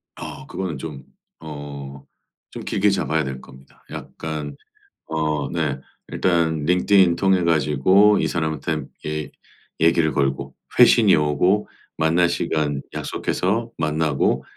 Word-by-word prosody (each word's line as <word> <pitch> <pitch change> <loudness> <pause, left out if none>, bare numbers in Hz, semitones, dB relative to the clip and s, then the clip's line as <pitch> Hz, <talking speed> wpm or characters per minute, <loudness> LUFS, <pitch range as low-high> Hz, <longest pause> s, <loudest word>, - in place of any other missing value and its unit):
아. - - -8
그거는 90 -6 -4
좀 70 -1 -7 0.4
어 70 -3 -8 0.5
좀 - - -7
길게 100 +1 +1
잡아야 80 -4 0
될 65 -2 -5
겁니다. 65 +1 -17
약간 75 -3 -6 0.5
어 75 -3 -1
네. 75 -5 -2 0.3
일단 80 -4 +1
링크드인 90 +1 +4
통해 95 0 +2
가지고 85 +6 +4
이 - - +1
사람한테 80 -2 -2 0.2
얘 75 0 -4 0.5
얘기를 80 -1 +3
걸고 70 0 -1 0.2
회신이 - - +6
오고 90 +7 +1 0.3
만날 80 +2 +3
시간 75 -4 -1
약속해서 115 +6 -2
만나고 75 -2 0
80 Hz, 240 characters per minute, -22 LUFS, 75-85 Hz, 0.5 s, 회신이